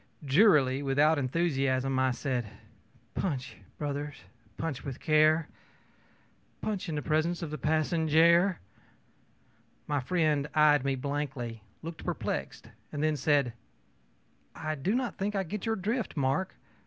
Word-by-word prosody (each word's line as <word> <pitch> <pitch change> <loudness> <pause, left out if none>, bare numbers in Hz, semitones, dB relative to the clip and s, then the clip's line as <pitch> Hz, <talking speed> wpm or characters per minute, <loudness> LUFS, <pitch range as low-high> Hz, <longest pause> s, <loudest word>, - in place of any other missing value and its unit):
ö - - -9
Drearily, 140 -5 +5
without 145 +3 +3
enthusiasm, 135 -2 0
I 130 0 +3
said: 125 -2 -2 0.7
ōPunch 135 -8 -2 0.2
brothers, 145 0 -3 0.4
punch 155 -5 -3
with 135 -4 -6
care! 155 0 +4 1.1
Punch 200 -4 -3
in 155 - -2
the 145 - -3
presence 165 +3 0
of 155 - -5
the 155 - -5
passenjare!ö 160 +4 +3 1.3
My 145 -1 0
friend 150 0 +1
eyed 150 -3 +5
me 135 -1 0
blankly, 135 -4 -4 0.2
looked 165 0 -7
perplexed, - - -4 0.2
then 155 +1 0
said: 140 -3 +2 1.0
ōI 155 -2 -4
do 195 - +1
not 250 -3 -2
think 205 +2 -1
I 195 - +1
get 200 +4 -5
your 225 - +1
drift, 220 +1 -2
Mark. 140 +7 0
150 Hz, 130 wpm, -29 LUFS, 135-170 Hz, 1.3 s, Drearily